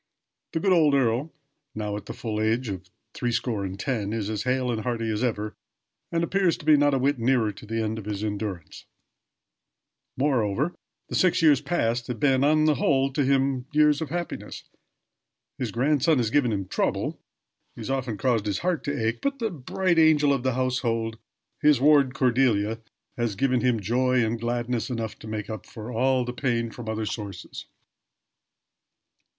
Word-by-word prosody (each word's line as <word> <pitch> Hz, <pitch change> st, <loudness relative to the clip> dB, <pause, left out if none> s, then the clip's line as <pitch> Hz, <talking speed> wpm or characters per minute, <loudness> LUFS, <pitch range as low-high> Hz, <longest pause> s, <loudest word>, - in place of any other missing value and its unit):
The 160 Hz, -, 0 dB
good 195 Hz, +2 st, +1 dB
old 155 Hz, -5 st, +4 dB
earl, 130 Hz, +4 st, +1 dB, 0.4 s
now 105 Hz, -1 st, -3 dB
at 105 Hz, -, -7 dB
the -, -, -5 dB
full 110 Hz, -2 st, -3 dB
age 115 Hz, +2 st, 0 dB
of 95 Hz, -1 st, -6 dB, 0.2 s
three 120 Hz, -1 st, -2 dB
score 115 Hz, -3 st, -1 dB
and 95 Hz, 0 st, -5 dB
ten, 110 Hz, -4 st, -2 dB
is 110 Hz, -2 st, -2 dB
as 105 Hz, -2 st, -2 dB
hale 125 Hz, -1 st, +1 dB
and 110 Hz, -2 st, -2 dB
hearty 115 Hz, -1 st, -2 dB
as 105 Hz, +3 st, -1 dB
ever, 110 Hz, -3 st, -2 dB, 0.6 s
and 170 Hz, 0 st, 0 dB
appears 185 Hz, 0 st, +1 dB
to -, -, -13 dB
be 155 Hz, -1 st, +7 dB
not 145 Hz, -1 st, +3 dB
a -, -, +2 dB
whit 135 Hz, 0 st, +1 dB
nearer 115 Hz, -2 st, +2 dB
to 105 Hz, -, -13 dB
the 115 Hz, +1 st, -1 dB
end 110 Hz, +1 st, -2 dB
of 105 Hz, -, -9 dB
his 105 Hz, -1 st, -4 dB
endurance. 100 Hz, -5 st, -5 dB, 1.3 s
Moreover, 130 Hz, -, +1 dB, 0.3 s
the -, -, -9 dB
six 180 Hz, -2 st, +3 dB
years 150 Hz, -4 st, +6 dB
last -, -, -19 dB
past 120 Hz, -8 st, 0 dB
have 125 Hz, -, -4 dB
been, 135 Hz, -2 st, +3 dB
on 155 Hz, +1 st, +4 dB
the 155 Hz, -, +4 dB
whole, 135 Hz, -1 st, +1 dB
to 145 Hz, -, +1 dB
him 135 Hz, -1 st, +1 dB
years 150 Hz, 0 st, +4 dB
of 160 Hz, -, -3 dB
happiness. 175 Hz, +2 st, -5 dB, 1.0 s
His 125 Hz, -5 st, -2 dB
grandson 145 Hz, +6 st, +2 dB
has 115 Hz, -3 st, 0 dB
given 130 Hz, -4 st, +3 dB
him 100 Hz, -3 st, -2 dB
trouble -, -, -1 dB, 0.6 s
has -, -, -5 dB
often 130 Hz, -5 st, -2 dB
caused 115 Hz, -3 st, +1 dB
his 100 Hz, -, 0 dB
heart 180 Hz, -4 st, 0 dB
to 140 Hz, -6 st, -1 dB
ache; 115 Hz, -, -2 dB
but 280 Hz, 0 st, -1 dB
the 225 Hz, -4 st, -2 dB
bright 170 Hz, +3 st, 0 dB
angel 150 Hz, -3 st, +5 dB
of 135 Hz, -, -1 dB
the 130 Hz, -1 st, 0 dB
household 115 Hz, -3 st, -1 dB, 0.4 s
his 150 Hz, -3 st, +5 dB
ward 140 Hz, -2 st, +4 dB
Cordelia 115 Hz, -4 st, +2 dB, 0.4 s
has 120 Hz, -4 st, -1 dB
given 125 Hz, +3 st, +1 dB
him 125 Hz, -3 st, +2 dB
joy 125 Hz, +4 st, +2 dB
and 115 Hz, +1 st, -2 dB
gladness 120 Hz, 0 st, -2 dB
enough 115 Hz, -3 st, -4 dB
to -, -, -10 dB
make 110 Hz, -1 st, -4 dB
up 110 Hz, -4 st, -7 dB
for 115 Hz, 0 st, -8 dB
all 130 Hz, +2 st, +2 dB
the 125 Hz, -, -4 dB
pain 120 Hz, -3 st, -1 dB
from 115 Hz, -2 st, -8 dB
other 110 Hz, 0 st, -2 dB
sources. 100 Hz, -4 st, -6 dB
125 Hz, 185 wpm, -26 LUFS, 110-140 Hz, 1.3 s, be